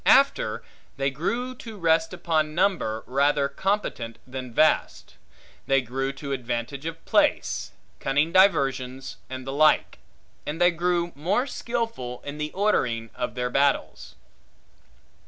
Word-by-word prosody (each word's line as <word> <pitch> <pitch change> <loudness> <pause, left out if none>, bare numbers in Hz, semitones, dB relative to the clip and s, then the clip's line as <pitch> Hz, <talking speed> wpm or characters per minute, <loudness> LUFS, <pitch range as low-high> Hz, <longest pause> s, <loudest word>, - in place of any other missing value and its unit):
After, - - +4 0.3
they 135 0 0
grew 235 - -2
to 225 -3 -10
rest 165 -2 +2
upon 160 -4 0
number 170 - +1
rather 140 +2 +2
competent, 140 - -2
than 130 -1 -7
vast; 155 +7 +1 0.5
they 135 0 +4
grew 135 +2 -2
to 140 0 -7
advantages 125 +3 -3
of 165 - -12
place, - - +1 0.3
cunning 145 +4 +1
diversions, 135 -9 +2
and 130 0 -6
the 135 - -4
like: 155 +1 +3 0.4
and 150 +3 -4
they 175 0 +5
grew 175 0 0
more 190 - 0
skilful 230 - -3
in 145 +1 -6
the 150 0 -3
ordering 125 - 0
of 125 - -4
their 125 0 -2
battles. 135 - 0
145 Hz, 130 wpm, -25 LUFS, 130-175 Hz, 0.5 s, they